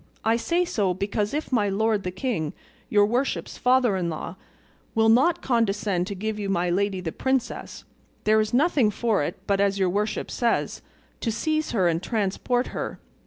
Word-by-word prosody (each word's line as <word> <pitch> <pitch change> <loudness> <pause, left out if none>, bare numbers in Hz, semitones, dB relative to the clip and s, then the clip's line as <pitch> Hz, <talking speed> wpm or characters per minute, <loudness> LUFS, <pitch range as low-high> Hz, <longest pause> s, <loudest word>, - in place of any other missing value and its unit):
I 225 +1 +4
say 340 +9 +1
so 200 - 0
because 205 +2 -1
if 300 0 -3
my 210 -5 +2
lord 215 +1 +1
the 185 - -3
king, 180 - -2 0.4
your 205 -1 +5
worship's 245 +6 -1
father 250 -4 +3
in 175 -2 -1
law, 155 - -5 0.6
will 225 0 +4
not 295 +10 +4
condescend 205 -6 +1
to 200 - -4
give 215 +2 -3
you 200 -1 -3
my 175 -2 +1
lady 195 +1 0
the 165 -3 -3
princess, 265 +4 -2 0.4
there 215 0 +4
is 215 0 -2
nothing 270 -3 +3
for 215 -2 0
it 165 +6 -3
but, 200 -1 +1
as 200 0 +2
your 190 -2 +2
worship 210 +3 -2
says, 235 -2 0 0.4
to 230 - -1
seize 310 +7 -1
her 190 -6 +2
and 165 0 +1
transport 225 +4 -1
her. - - -4
210 Hz, 180 wpm, -25 LUFS, 195-240 Hz, 0.6 s, your